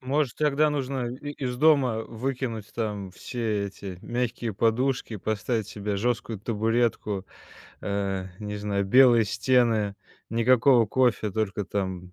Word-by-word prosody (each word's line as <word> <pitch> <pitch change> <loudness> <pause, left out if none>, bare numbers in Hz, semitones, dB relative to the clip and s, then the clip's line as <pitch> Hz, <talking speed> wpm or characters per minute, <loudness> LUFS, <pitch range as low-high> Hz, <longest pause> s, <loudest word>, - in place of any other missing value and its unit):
Может, 135 +1 0
тогда 150 0 +3
нужно 135 -3 -2
и 145 +2 -7
из 130 -4 -4
дома 135 -6 +4
выкинуть 120 -2 -4
там 105 -4 -3
все 110 -3 -2
эти 95 -2 -8
мягкие 120 -1 -2
подушки, 115 +3 0
поставить 110 +2 -2
себе 105 -1 -3
жесткую 115 -1 -1
табуретку, 110 -2 0 0.6
э, 100 -2 -2
не 105 -1 -5
знаю, 100 -1 -1
белые 120 +1 +6
стены, 115 -4 +2 0.4
никакого 120 +1 +4
кофе, 120 -2 +1
только 105 0 -2
там 95 -3 -3
115 Hz, 125 wpm, -26 LUFS, 105-125 Hz, 0.6 s, белые